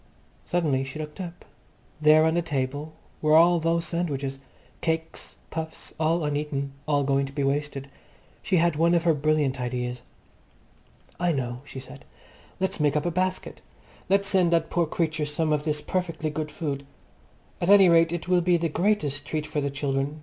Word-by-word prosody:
Suddenly 155 -7 +1
she 135 +2 -7
looked 155 +4 -6
up. 175 -1 -8 0.6
There 155 +1 +6
on 160 - +2
the 175 - +2
table 145 0 -3 0.3
were 155 0 +4
all 170 +1 +6
those 165 +1 +1
sandwiches, 140 -6 -2 0.4
cakes, 160 0 -2 0.2
puffs, 160 0 -5
all 160 +1 +1
uneaten, 145 -1 -2 0.2
all 145 -2 +2
going 135 0 +1
to - - -9
be 140 0 -2
wasted. 140 0 -1 0.5
She 185 - +1
had 170 -1 +3
one 170 +3 +3
of 170 - +2
her 170 -2 +4
brilliant 145 -3 +1
ideas. 125 0 -3 1.2
"I 175 0 +2
know," 125 -4 -3
she 135 - -8
said. 130 - -11 0.6
"Let's 190 -2 -1
make 150 -1 +2
up 150 - 0
a 175 - +1
basket. 185 +2 -2 0.5
Let's 195 +1 +3
send 185 -4 +3
that 165 -1 +1
poor 170 -2 +1
creature 160 -1 -1
some 155 +1 0
of 150 0 -1
this 150 -1 0
perfectly 165 -4 -2
good 150 0 -3
food. 145 -3 -4 0.8
At 175 - 0
any 200 -2 +8
rate, 165 -1 +5
it 175 0 -4
will 180 -1 +3
be 175 0 +3
the 165 0 -1
greatest 150 -6 0
treat 155 -1 -3
for 155 -1 -2
the 140 - -1
children. 140 +1 -2
155 Hz, 180 wpm, -26 LUFS, 145-170 Hz, 1.2 s, any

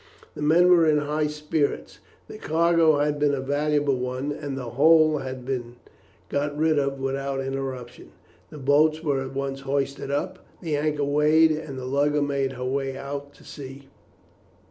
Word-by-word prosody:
The - - -9
men 170 +4 +4
were 170 -2 +5
in 150 - +3
high 150 +1 0
spirits. 150 0 -2 0.3
The - - -10
cargo 165 -1 +3
had 145 0 0
been 145 -1 +2
a - - -4
valuable 145 0 0
one, 125 +3 -3
and 145 -2 -5
the 125 -3 -6
whole 155 +3 +5
had 130 -2 -6
been 120 -2 -4 0.5
got 145 +1 -2
rid 155 -1 +2
of 140 -1 -2
without 135 0 -2
interruption. 135 -2 -5 0.4
The - - -10
boats 150 +3 +2
were 140 -4 0
at 135 0 -8
once 135 0 -3
hoisted 140 0 -2
up, 145 +6 -2 0.2
the 160 -4 -2
anchor 150 0 -1
weighed, 150 +3 +4
and 155 -3 -4
the 130 - -6
lugger 145 +2 +1
made 140 -2 -1
her 125 0 -5
way 135 0 -2
out 140 +1 -7
to - - -19
sea. 135 -1 -10
145 Hz, 170 wpm, -25 LUFS, 135-150 Hz, 0.5 s, were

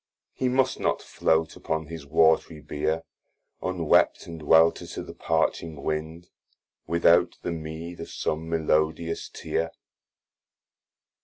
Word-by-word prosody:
He 130 - 0
must 130 +1 +1
not - - +1
flote 80 0 0
upon 80 0 -3
his 80 -2 -8
watry 80 +1 +3
bear 75 +2 -2 0.6
Unwept, 90 -4 +2
and 85 -1 -8
welter 80 +2 +4
to - - -6
the - - -9
parching 80 -4 -1
wind, 80 +3 -4 0.6
Without 85 +1 +4
the 85 - -2
meed 80 +1 -6
of 85 - -7
som 80 +1 -3
melodious 80 0 0
tear. 80 0 -2
80 Hz, 120 wpm, -26 LUFS, 80-85 Hz, 0.6 s, welter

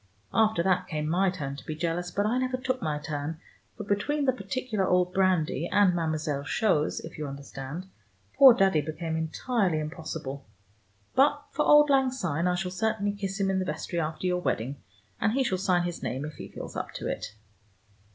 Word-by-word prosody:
After 220 -5 +3
that 185 0 +1
came 150 -3 -2
my 185 +4 +3
turn 145 -7 -4
to - - -10
be 155 - -3
jealous, 170 +2 -2
but 200 +3 0
I 240 +4 +1
never 255 0 0
took 255 0 -2
my 150 -5 -1
turn, 150 +1 -4 0.4
for 210 - -5
between 245 +9 0
the 260 - +3
particular 215 0 -2
old 180 0 +2
brandy 180 -5 +1
and 200 -3 +5
Mademoiselle 155 -4 -1
Chose, 155 -1 +1
if 160 0 -10
you 150 - -3
understand, 140 +4 -7 0.5
poor 265 -4 +9
Daddy 190 -7 +3
became 160 +1 -4
entirely 175 +3 0
impossible. 155 -3 -5 0.7
But 285 +2 +3
for 300 - 0
auld 295 0 +7
lang 265 -1 +4
syne 180 - -1
I 180 - +2
shall 180 0 -2
certainly 205 +1 0
kiss 200 -1 -4
him 195 -1 +2
in 190 - +1
the 185 - -1
vestry 160 +2 -3
after 155 +2 -3
your 180 0 +1
wedding, 135 -4 -1 0.4
and 215 - +2
he 270 +1 +2
shall 190 -7 0
sign 180 -2 +2
his 175 -1 -4
name 130 +5 -3
if 155 - -6
he - - -8
feels - - -8
up - - -4
to - - -6
it." 105 - -4
180 Hz, 195 wpm, -28 LUFS, 155-210 Hz, 0.7 s, poor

